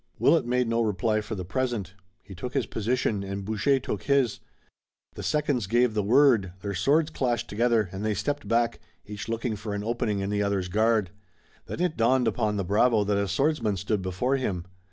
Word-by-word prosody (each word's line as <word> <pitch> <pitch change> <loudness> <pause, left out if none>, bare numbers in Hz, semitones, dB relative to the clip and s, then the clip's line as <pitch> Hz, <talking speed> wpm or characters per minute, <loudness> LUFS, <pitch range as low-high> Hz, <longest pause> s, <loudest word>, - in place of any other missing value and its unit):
Willet 155 -7 +3
made 125 0 +1
no 115 0 +1
reply 110 0 0
for 105 +1 -5
the 90 -2 -5
present. 115 -3 -2 0.3
He 95 - -11
took 120 +9 -7
his 135 - +1
position 110 -2 -1
and 100 0 -5
Boucher 110 +6 +1
took 105 - -4
his. 135 -5 +2 0.7
The - - -8
seconds 145 -8 0
gave 120 +2 +2
the 105 - +1
word, 115 -4 +4
their 100 -1 -3
swords 150 - +2
clashed 125 -5 -1
together, 115 -1 +1
and 95 +2 -5
they 110 -1 0
stepped 145 +4 -2
back, 115 0 +1 0.3
each 105 +1 -7
looking 115 0 -2
for 105 0 -5
an 100 - -3
opening 115 -2 -1
in 100 +1 -2
the 105 0 0
other's 100 -3 -1
guard. 110 -1 +2 0.6
Then - - -5
it 180 -3 0
dawned 120 +2 +3
upon 105 -3 0
the 100 - -1
bravo 110 +3 +3
that 105 0 0
a 100 - 0
swordsman 115 - 0
stood 100 +2 -1
before 95 +9 0
him. 95 -9 -3
110 Hz, 195 wpm, -26 LUFS, 100-125 Hz, 0.7 s, word